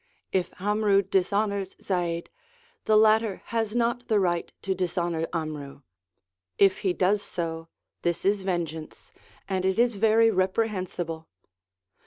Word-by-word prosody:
If 185 -2 0
'Amru 205 0 +2
dishonours 195 +1 0
Zaid, 175 -3 -2 0.5
the 215 - +5
latter 220 -2 +3
has 225 -1 0
not 240 +1 0
the 215 -2 +3
right 175 -3 0
to 195 - 0
dishonour 175 -2 -1
'Amru; 150 -4 -5 0.8
if 195 -1 +4
he 190 - +1
does 190 +3 +2
so, 165 -3 -4 0.3
this 175 +1 -1
is 200 0 +2
vengeance, 165 -4 -4 0.4
and 190 -1 -1
it 190 +1 +1
is 235 -2 +2
very 225 +2 +4
reprehensible. 185 -4 -1
190 Hz, 125 wpm, -26 LUFS, 175-210 Hz, 0.8 s, the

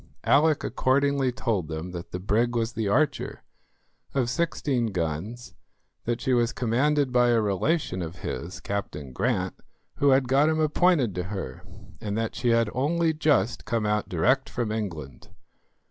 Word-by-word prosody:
Alick 150 +1 +4
accordingly 140 0 +1
told 115 -9 -1
them 80 +3 -5
that 85 0 -7
the 90 - -5
brig 115 +6 +1
was 115 0 0
the 110 -3 -2
Archer, 145 +9 0 0.7
of 125 -3 +1
sixteen 135 -5 0
guns, 95 +6 -4 0.5
that 120 0 -1
she 130 +1 0
was 120 0 +2
commanded 130 +4 +1
by 125 -1 +4
a 120 -1 +4
relation 105 - 0
of 85 0 -5
his, 85 +3 -5
Captain 75 -9 -4
Grant, 95 - 0 0.4
who 140 - +3
had 130 -1 +4
got 140 +4 +4
him 160 0 +1
appointed 155 - +3
to 90 0 -3
her, 95 -10 -6 0.4
and 105 -2 -3
that 115 -1 -1
she 120 - -1
had 115 -2 +3
only 160 +5 +1
just 150 -6 +1
come 115 -2 -1
out 105 0 0
direct - - +2
from 120 -3 -2
England. 80 - -5
120 Hz, 160 wpm, -26 LUFS, 100-135 Hz, 0.7 s, Alick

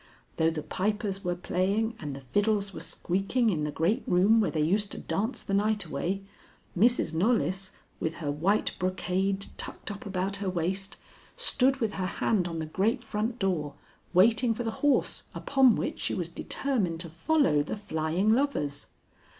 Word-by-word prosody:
Though 160 0 +4
the 155 -2 -4
pipers 205 0 -2
were 175 -1 0
playing 195 +6 0
and 145 -3 -5
the - - -7
fiddles 200 - 0
were - - -6
squeaking 195 +6 0
in 150 -4 -1
the 150 - -2
great 170 +9 +1
room 200 +6 +5
where 210 - +1
they 155 - -1
used 200 +5 +1
to - - -7
dance 220 +6 -2
the 195 - -4
night 210 +1 +1
away, 195 +2 -2 0.5
Mrs. 230 -3 +3
Knollys, 190 0 +1 0.3
with 160 +1 -2
her 150 -4 -3
white 180 +9 +1
brocade 190 +2 0
tucked - - -4
up 205 - -7
about 195 +1 -1
her 200 -1 -2
waist, 185 +2 -2 0.4
stood 270 - +2
with 225 -5 -1
her 185 -1 -2
hand 185 -2 0
on 165 -1 -4
the 160 - -2
great 195 +8 0
front 220 +3 -2
door, 175 -8 -1 0.4
waiting 225 +5 +4
for 240 - -3
the 225 - -1
horse 290 -1 +2
upon 265 -5 +4
which - - -3
she - - -1
was 175 -3 -2
determined 190 -4 -1
to 175 - -6
follow 165 - +2
the 150 - -4
flying 180 +1 0
lovers. 185 - -1
195 Hz, 175 wpm, -28 LUFS, 170-220 Hz, 0.5 s, room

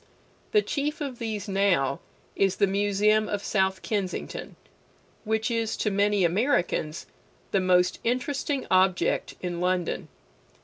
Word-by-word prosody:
The 425 -1 +4
chief 295 +2 -2
of 275 -5 -5
these 220 -3 -4
now 190 -9 +2 0.4
is 195 -1 +2
the - - +3
Museum 205 +2 +2
of 205 -1 -2
South 190 -2 0
Kensington, 200 -4 -3 0.7
which 220 +2 0
is 230 -1 -1
to 210 - 0
many 200 0 +2
Americans 175 - 0 0.5
the 195 - +3
most 180 -1 +3
interesting 265 +3 -1
object 185 -1 +2
in 175 -1 -3
London. 180 -1 -1
200 Hz, 125 wpm, -26 LUFS, 185-225 Hz, 0.7 s, The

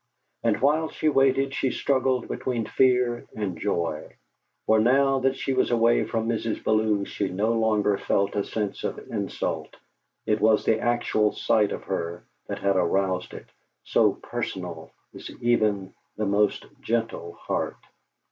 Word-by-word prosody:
And - - +1
while 155 +4 +2
she 155 - 0
waited 135 -1 +2
she 135 - 0
struggled 130 -2 0
between 120 -4 -2
fear 125 -1 +2
and 100 -5 -3
joy; 85 -6 -2 0.5
for 110 0 +4
now 135 +4 +3
that 135 +1 +1
she 135 - -1
was 130 - +2
away 120 0 +3
from 115 -1 -2
Mrs. 115 -1 -2
Bellew 110 -2 +2
she 100 -1 -3
no 105 +5 0
longer 105 -3 +2
felt 100 +1 0
a 100 - +1
sense 105 -2 -4
of - - -2
insult. 100 -4 -3 0.5
It 105 0 +1
was 110 -1 +4
the 110 - +3
actual 115 -3 +1
sight 105 -2 +2
of - - -5
her 85 +1 -4 0.2
that - - -4
had 100 -1 +1
aroused 95 +1 0
it, - - -9 0.4
so - - +3
personal - - -5 0.2
is - - -9
even 105 -5 +1 0.2
the 105 - -1
most 100 +1 +1 0.2
gentle 115 -7 -2
heart. - - -3
110 Hz, 150 wpm, -25 LUFS, 100-125 Hz, 0.5 s, for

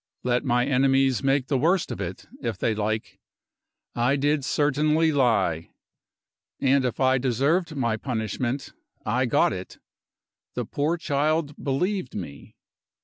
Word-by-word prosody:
Let 125 0 +1
my 125 -2 +2
enemies 135 -1 +2
make 135 -1 +2
the 135 -1 0
worst 170 +5 +2
of 95 - -5
it, 90 -1 -6 0.2
if 115 -6 -3
they 110 - 0
like 110 +1 -3 0.7
I 120 +4 +2
did 145 +1 +1
certainly 150 +3 +2
lie. 110 - +1 0.9
And 135 0 +3
if 125 - -2
I 130 -1 +3
deserved 140 +7 +1
my 120 -5 0
punishment, 120 +2 -3 0.3
I - - +1
got - - +3
it; - - -8 0.8
the - - -2
poor 155 +4 -1
child 150 0 -1
believed 180 +3 -1
me! 85 -7 -8
135 Hz, 135 wpm, -25 LUFS, 120-145 Hz, 0.9 s, And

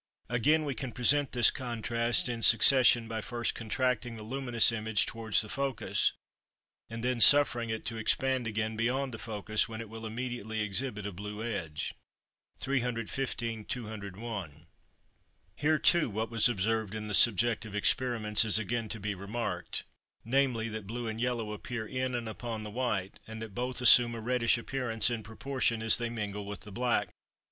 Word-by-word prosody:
Again, 150 +6 +2
we 140 - -2
can 130 0 -6
present 140 +3 +3
this 120 -2 +5
contrast 120 -1 0
in 120 -2 -4
succession 120 0 +6
by 110 -1 -4
first 120 +1 -2
contracting 120 0 -2
the 110 - -9
luminous 120 0 +2
image 110 -1 0
towards 110 -1 +1
the 110 - -4
focus, 135 +2 -1 0.8
and 115 0 -7
then 125 -1 0
suffering 120 -5 +5
it 110 0 -4
to 115 - -5
expand 130 +2 0
again 110 0 -2
beyond 125 +4 -1
the 115 - -7
focus, 110 0 -2
when 110 -1 -7
it 115 -2 -7
will 110 0 -7
immediately 110 -2 -4
exhibit 105 +1 -2
a 100 - -4
blue 105 +3 -7
edge. 85 -10 -4 0.7
315 120 -3 -2
(201). 100 - -6 0.9
Here 155 +2 +2
too 170 -2 +4
what 110 +2 -3
was 115 +1 +3
observed 110 -1 -1
in 105 0 -5
the 105 - -5
subjective 115 0 +3
experiments 110 -1 +2
is 110 -2 +3
again 115 +1 -2
to 110 - -5
be 105 +1 -3
remarked, 100 -1 -4 0.4
namely, 125 -2 +1
that 110 -2 -7
blue 120 +2 -5
and 110 +1 -4
yellow 120 -3 -2
appear 110 +2 -5
in 130 +2 -3
and 120 -2 -4
upon 110 0 -5
the 105 - -7
white, 105 -5 -2
and 110 0 -8
that 110 -2 -8
both 125 +4 -2
assume 120 -1 +7
a - - -6
reddish 115 -1 +1
appearance 120 -2 -1
in 115 -2 -3
proportion 115 +1 -2
as 110 - +6
they 120 -1 -2
mingle 105 -3 -5
with 100 0 -6
the 105 - -11
black. 115 -3 0
115 Hz, 170 wpm, -30 LUFS, 110-125 Hz, 0.9 s, assume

